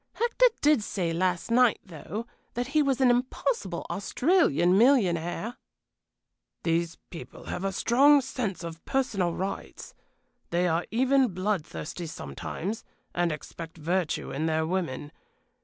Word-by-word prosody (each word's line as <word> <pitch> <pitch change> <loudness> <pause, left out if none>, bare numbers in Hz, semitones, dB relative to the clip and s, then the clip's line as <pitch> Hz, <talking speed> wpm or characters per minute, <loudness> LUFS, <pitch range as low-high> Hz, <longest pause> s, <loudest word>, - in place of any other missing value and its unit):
"Hector 480 +2 +3
did 295 -4 +4
say 180 -5 -2
last 180 +4 0
night, 245 0 +5
though, 185 +5 -6 0.3
that 245 +2 -2
he 305 +1 +3
was 270 -2 +1
an 255 -2 +6
impossible 255 - -1
Australian 245 - +2
millionaire." 205 - +2 1.1
"These 165 0 0 0.2
people 165 - -9
have 180 - -5
a 195 - 0
strong 275 +9 +5
sense 230 -9 -4
of 165 -1 -7
personal 200 -10 0
rights 190 +1 -5 0.6
they 175 +1 +1
are 165 +1 0
even 255 -2 +2
blood 185 -2 0
thirsty 170 +3 -6
sometimes, 160 - -5 0.3
and 175 -1 +1
expect 160 +2 -8
virtue 170 +1 -1
in 155 +4 -1
their 160 0 +1
women. 160 -5 -2
190 Hz, 130 wpm, -28 LUFS, 170-250 Hz, 1.1 s, an